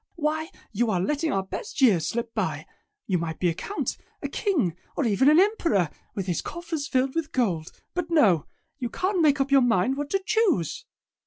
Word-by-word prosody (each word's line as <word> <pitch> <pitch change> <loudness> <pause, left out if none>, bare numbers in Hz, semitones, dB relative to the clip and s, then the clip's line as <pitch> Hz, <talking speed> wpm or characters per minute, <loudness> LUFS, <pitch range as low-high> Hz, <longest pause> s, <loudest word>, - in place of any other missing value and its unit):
Why 315 0 -1 0.2
you 230 +2 0
are 190 -4 +1
letting 300 - 0
our 195 -4 0
best 190 - -6
years 210 - +4
slip 230 0 -3
by. 160 -9 -2 0.4
You 185 -3 +1
might 160 -1 -3
be 180 - +2
a - - 0
count, 405 - -3 0.3
a - - 0
king, 290 - 0 0.2
or 285 - +1
even 235 +5 +4
an 305 +3 +6
emperor, 335 - +2 0.2
with 195 - -2
his 180 -3 -1
coffers 330 -3 -4
filled 260 +1 +1
with 330 -2 -2
gold. 180 -11 0 0.2
But 350 -2 -2
no! 210 - +4 0.3
You 245 -3 -2
can't 370 - 0
make 300 -2 +4
up 275 0 0
your 275 -1 +6
mind 245 +2 +2
what 290 0 -3
to 390 +2 0
choose!" 415 - +1
260 Hz, 195 wpm, -26 LUFS, -, 0.4 s, an